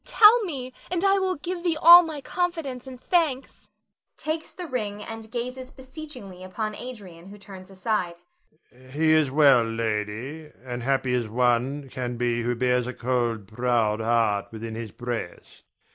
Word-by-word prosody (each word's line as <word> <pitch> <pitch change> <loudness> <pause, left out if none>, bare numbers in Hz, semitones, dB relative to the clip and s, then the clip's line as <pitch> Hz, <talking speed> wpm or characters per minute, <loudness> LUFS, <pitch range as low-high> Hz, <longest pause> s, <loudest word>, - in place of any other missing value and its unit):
Tell 450 +2 +6
me, 260 -7 -5 0.2
and 360 +1 -1
I 390 0 +4
will 375 -1 0
give 345 +4 -5
thee 335 -3 +1
all 345 +2 +10
my 315 -4 -6
confidence 310 -6 -3
and 255 -1 -9
thanks 305 -5 -1 0.5
[takes 315 +1 -4
the 360 - -7
ring 210 -8 -4
and 225 0 -8
gazes 250 +2 -5
beseechingly 260 - -10
upon 215 +3 -4
Adrian, 200 -8 -9
who 205 +1 -11
turns 195 -2 -12
aside]. 190 -3 -2 0.6
Adrian. 130 +1 -18
He 155 +2 +2
is 155 -3 +4
well, 140 -4 +5
lady, 115 +6 -3
and 125 -1 -5
happy 130 0 0
as 120 -3 0
one 125 +4 +1
can 125 -1 -4
be 120 0 0
who 120 +1 -1
bears 125 0 +1
a 125 - -5
cold, 120 -4 -1
proud 115 -1 0
heart 110 -3 +1
within 115 0 -6
his 115 0 -6
breast. 120 -4 -7
165 Hz, 160 wpm, -25 LUFS, -, 0.6 s, all